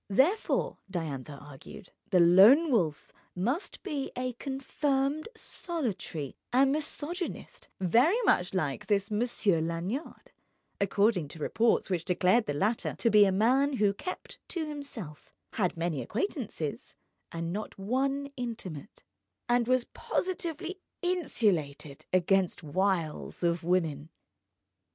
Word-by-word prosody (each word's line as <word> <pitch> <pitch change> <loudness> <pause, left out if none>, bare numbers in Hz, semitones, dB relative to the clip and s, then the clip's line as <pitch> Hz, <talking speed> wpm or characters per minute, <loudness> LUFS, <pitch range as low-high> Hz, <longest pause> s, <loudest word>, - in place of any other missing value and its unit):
Therefore 295 - +2
(Diantha 150 -6 -4
argued) 145 +7 -12 0.2
the 185 - +4
Lone 205 - +7
Wolf 165 - 0 0.2
must 245 - -2
be 295 -8 -3
a 250 0 -2
confirmed 275 - -1
solitary 210 - -4 0.2
and 265 +2 +4
misogynist—very 305 - 0
much 180 +1 +2
like 145 -8 -1
this 200 -1 +1
Monsieur 210 -6 +1
Lanyard, 170 - -4 0.5
according 200 -3 +2
to 155 - -10
reports 225 +6 +1
which 175 -3 0
declared 185 +6 +2
the 145 - -1
latter 210 +9 0
to 230 - +2
be 210 0 +7
a 195 - +2
man 255 +9 +3
who 210 -5 +2
kept 365 - -7
to 335 -3 -3
himself, 275 - -8 0.2
had 185 -5 0
many 165 -4 -1
acquaintances 205 - -4 0.4
and 165 +1 -3
not 215 +2 -5
one 270 +7 -1
intimate, 220 - -6 0.4
and 240 -1 +2
was 255 -1 +3
positively 360 0 -3 0.2
insulated 190 - 0
against 185 0 +2
wiles 170 0 -1
of 170 -1 +1
woman. 165 -4 0
210 Hz, 115 wpm, -29 LUFS, 170-270 Hz, 0.5 s, Lone